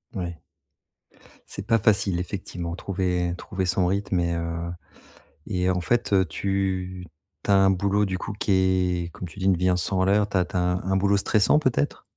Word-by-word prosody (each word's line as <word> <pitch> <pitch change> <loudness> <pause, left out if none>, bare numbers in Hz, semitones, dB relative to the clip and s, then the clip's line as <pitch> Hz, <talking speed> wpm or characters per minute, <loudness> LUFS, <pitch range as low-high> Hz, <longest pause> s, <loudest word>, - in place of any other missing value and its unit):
Oui. 85 -3 -4 1.1
C'est 100 - -6
pas 115 +1 +3
facile 100 -4 +2
effectivement, 90 -2 -5
trouver 90 -2 -1
trouver 95 -1 -3
son 90 0 +1
rythme 95 -1 0
et 85 0 0
heu 85 0 -3 0.8
et 90 -2 0
en 90 -1 +1
fait 115 +8 0
heu, 95 -2 +4
tu 95 -2 -2 0.3
tu - - -1
as - - +6
un 95 0 +5
boulot 100 +2 +1
du 95 -2 -1
coup, 110 - -5
qui 100 0 -2 0.5
est, - - -7
comme 90 - -7
tu 90 - -12
dis, 95 - -2
une 95 -1 +4
vie 90 +2 +1
un 90 - +2
100 95 +1 -1
à - - +3
l'heure, 100 +2 +3
tu 105 - -7
as 90 - +4
tu 90 - -5
as - - +3
un 90 +2 0
boulot 100 +1 +3
stressant, 105 +6 +3
peut-être? 125 - 0
95 Hz, 200 wpm, -25 LUFS, 90-100 Hz, 1.1 s, as